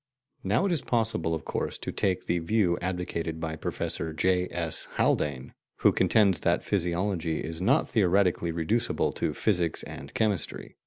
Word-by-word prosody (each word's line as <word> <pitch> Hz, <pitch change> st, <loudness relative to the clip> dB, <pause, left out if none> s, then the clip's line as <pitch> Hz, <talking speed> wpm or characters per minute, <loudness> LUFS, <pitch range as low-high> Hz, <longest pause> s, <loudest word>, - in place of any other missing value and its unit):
Now 105 Hz, -, +2 dB
it 195 Hz, -, +1 dB
is 165 Hz, -6 st, +1 dB
possible, 110 Hz, -10 st, +1 dB
of 80 Hz, -, -7 dB
course, -, -, -2 dB
to -, -, -5 dB
take 95 Hz, -2 st, 0 dB
the 85 Hz, -, +1 dB
view 90 Hz, +1 st, +2 dB
advocated 85 Hz, -3 st, -3 dB
by 80 Hz, -1 st, -3 dB
Professor 80 Hz, 0 st, -3 dB
J. 90 Hz, +2 st, +2 dB
S. 85 Hz, -3 st, -3 dB
Haldane, 65 Hz, -3 st, 0 dB, 0.3 s
who -, -, +6 dB
contends 100 Hz, -4 st, +3 dB
that -, -, +1 dB
physiology 85 Hz, -3 st, 0 dB
is 80 Hz, +2 st, -5 dB
not 135 Hz, +11 st, +3 dB
theoretically 95 Hz, -5 st, +2 dB
reducible 105 Hz, +9 st, 0 dB
to -, -, -2 dB
physics 90 Hz, -6 st, +1 dB
and 70 Hz, -, -9 dB
chemistry. 105 Hz, -5 st, -1 dB
90 Hz, 155 wpm, -28 LUFS, 80-105 Hz, 0.3 s, who